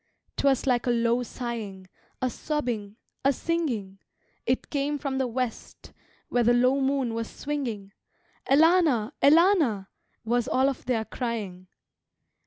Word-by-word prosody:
"'Twas 275 -2 +2
like 250 -2 +1
a - - +3
low 235 0 +2
sighing, 225 -6 -6 0.4
A 255 - +2
sobbing, 240 -10 -3 0.3
a 275 - +4
singing; 250 - -2 0.5
It 255 +2 -1
came 290 0 0
from 275 -2 -3
the 260 - +1
west, 245 0 -5 0.3
Where 245 - +1
the 240 +1 +4
low 255 +3 +3
moon 265 -3 0
was 230 0 -3
swinging: 240 -9 -4 0.6
'Elana, 300 -6 +4
Elana' 295 - +4 0.4
Was 240 +1 +1
all 265 +1 +3
of 270 - -6
their 235 -3 0
crying. 210 -8 -4
250 Hz, 130 wpm, -26 LUFS, 225-275 Hz, 0.6 s, a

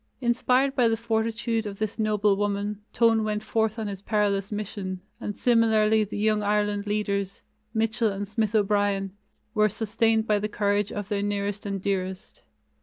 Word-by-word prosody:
Inspired 255 +2 +2
by 245 -2 +4
the 225 0 +1
fortitude 225 0 -1
of 200 -1 -6
this 215 +1 -3
noble 210 -2 +2
woman, 205 0 -2
Tone 225 -1 +3
went 210 0 -2
forth 220 0 0
on 220 - -3
his 195 -2 -6
perilous 205 -1 0
mission, 200 -3 -4 0.2
and 205 - -4
similarly 220 -2 +3
the 205 - -5
Young 215 0 +2
Ireland 205 0 0
leaders, 200 -2 -2 0.3
Mitchel 225 +1 +1
and 200 +1 -4
Smith 215 +1 -1
O'Brien, 205 -2 +1 0.4
were 215 -1 +3
sustained 225 +1 +1
by 210 -2 +2
the 210 +1 -2
courage 205 -1 0
of 205 -1 -5
their 205 -2 0
nearest 205 0 -2
and 200 -1 -2
dearest. 190 0 -3
210 Hz, 165 wpm, -26 LUFS, 200-220 Hz, 0.4 s, by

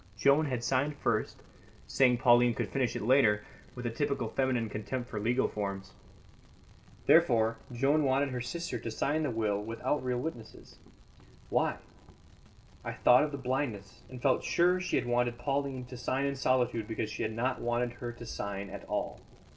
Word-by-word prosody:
Joan 140 +5 +4
had 125 -3 -2
signed 135 +4 +1
first, 110 -6 -1 0.4
saying 125 -2 +3
Pauline 120 -1 +5
could - - -2
finish 130 -3 -1
it - - -3
later, 110 -4 +4 0.3
with 125 -1 -7
a 120 - -1
typical 140 +3 -1
feminine 130 -4 0
contempt 120 +4 -5
for 105 - -3
legal 120 +5 +1
forms. 100 -2 -5 1.1
Therefore, 115 -9 +4
Joan 140 +5 +2
wanted 135 +1 +2
her 125 -1 -3
sister 125 -1 -4
to 115 - -5
sign 145 +7 0
the 150 - 0
will 110 -3 0
without 115 +6 -2
real 125 -1 -1
witnesses. 120 -5 -7 0.7
Why? - - +1 1.1
I - - -4
thought 125 +3 +5
of 150 - -5
the 140 - -4
blindness, 125 -6 -3
and 130 -1 -9
felt 130 +1 +2
sure 180 +1 +3
she 180 - -1
had - - +1
wanted 120 0 +1
Pauline 135 0 -2
to 125 0 -9
sign 130 +3 -1
in 140 0 -1
solitude 125 -4 +1
because 110 -1 -3
she - - -5
had 110 0 -2 0.2
wanted 120 0 0
her 120 0 -6
not 120 - -16
to 120 - -9
sign 100 -3 -5
at - - -8
all. - - -3
125 Hz, 175 wpm, -31 LUFS, 115-135 Hz, 1.1 s, Pauline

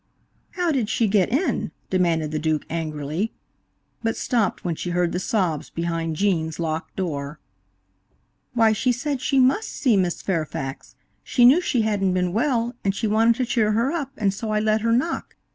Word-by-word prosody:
"How 355 -2 0
did 250 -8 0
she 230 - +2
get 195 -3 +2
in?" 290 +10 0 0.2
demanded 165 -4 +1
the 155 - -1
Duke 155 -1 0
angrily, 160 +4 -3 0.7
but 225 -1 -1
stopped 225 -8 0
when 175 - 0
she 175 - -5
heard 175 -1 +1
the 180 - -1
sobs 185 -7 -1
behind 165 -1 -2
Gene's 160 -4 0
locked 160 -1 -3
door. 150 -5 -4 1.2
"Why, 225 -2 +5
she 250 +4 +1
said 275 +2 -2
she 275 -1 +2
must 265 +13 +3
see 250 -6 +1
Miss 180 -3 0
Fairfax; 155 -7 -3 0.3
she 245 - +3
knew 280 +9 +7
she 245 -9 +1
hadn't 195 -4 +1
been 180 -1 0
well, 240 0 +1
and 195 0 0
she 225 - -2
wanted 225 +2 +3
to 255 - -1
cheer 225 -3 +1
her 235 +6 +1
up, 295 -5 -3
and 200 -3 +1
so 220 +2 -5
I 215 0 +1
let 215 0 +1
her 230 +1 +1
knock. 260 +9 -1
205 Hz, 180 wpm, -23 LUFS, 170-240 Hz, 1.2 s, knew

